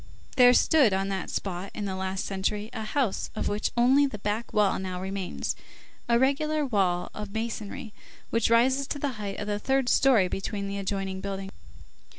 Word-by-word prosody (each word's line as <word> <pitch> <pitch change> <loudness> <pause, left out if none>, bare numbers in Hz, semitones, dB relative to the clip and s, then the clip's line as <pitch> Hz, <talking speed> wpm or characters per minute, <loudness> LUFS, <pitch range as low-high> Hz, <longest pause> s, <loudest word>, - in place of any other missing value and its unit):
There 250 -1 +8
stood 280 -11 +5
on 195 +1 0
that 190 -2 -3
spot, 190 0 -4
in 210 - -3
the 190 -1 -3
last 190 0 -3
century, 205 +3 -2
a 225 - -4
house 225 -1 -1
of - - -2
which 205 +1 -1
only 265 +4 +5
the 225 - -6
back 210 +3 -3
wall 210 -2 +2
now 185 -1 -4
remains, 190 0 -3 0.5
a 235 - +5
regular 295 +4 +1
wall 185 -7 0
of 210 -1 -6
masonry, 220 +1 -4 0.4
which 230 -1 +2
rises 260 +4 +3
to - - -3
the 285 0 -1
height 200 -1 -4
of - - -4
the 205 0 -2
third 265 +2 +1
story 240 -9 +5
between 200 +2 -3
the 200 0 -3
adjoining 195 -1 -3
buildings. 195 0 -5
210 Hz, 180 wpm, -27 LUFS, 195-245 Hz, 0.5 s, There